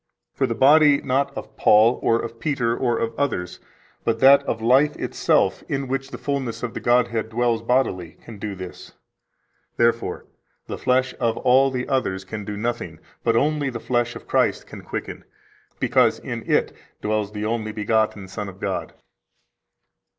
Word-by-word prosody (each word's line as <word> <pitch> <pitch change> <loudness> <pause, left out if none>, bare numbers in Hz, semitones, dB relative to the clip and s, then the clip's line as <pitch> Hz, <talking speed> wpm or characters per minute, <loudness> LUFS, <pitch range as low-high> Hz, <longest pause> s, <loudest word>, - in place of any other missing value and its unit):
For 135 - 0
the 115 - -2
body 145 +3 +6
not 135 +1 0
of - - -8
Paul 110 +3 +5
or 115 0 +2
of 115 0 -6
Peter 125 -6 0
or 120 -2 0
of 115 - -2
others, 110 -11 -2 0.4
but 115 -1 0
that 140 +2 +7
of - - -1
Life 130 +6 +3
itself - - +1
in 135 -1 -2
which 135 +1 -3
the - - -7
fullness 135 -5 -3
of 120 - -3
the - - -4
Godhead 120 -2 +1
dwells 115 0 0
bodily, 115 -9 0
can 110 -4 -12
do 100 -1 -4
this. 95 -1 -10 0.8
Therefore, 115 0 0 0.4
the - - -6
flesh 130 0 +1
of 115 -1 0
all 135 +2 +4
the 125 -1 -3
others 95 -8 -1
can 105 +2 -6
do 105 +1 -5
nothing, 120 +3 -3 0.3
but 115 - +2
only 145 +2 +1
the 120 -2 -5
flesh 120 0 -1
of - - -10
Christ - - +1
can - - -10
quicken, - - -6 0.6
because - - +3
in - - -7
it - - +2 0.3
dwells 105 -1 -1
the 105 0 -4
only 110 -1 -2
begotten 110 -2 0
Son 100 +1 -6
of 95 0 -13
God." 95 -2 -4
115 Hz, 170 wpm, -23 LUFS, 110-130 Hz, 0.8 s, that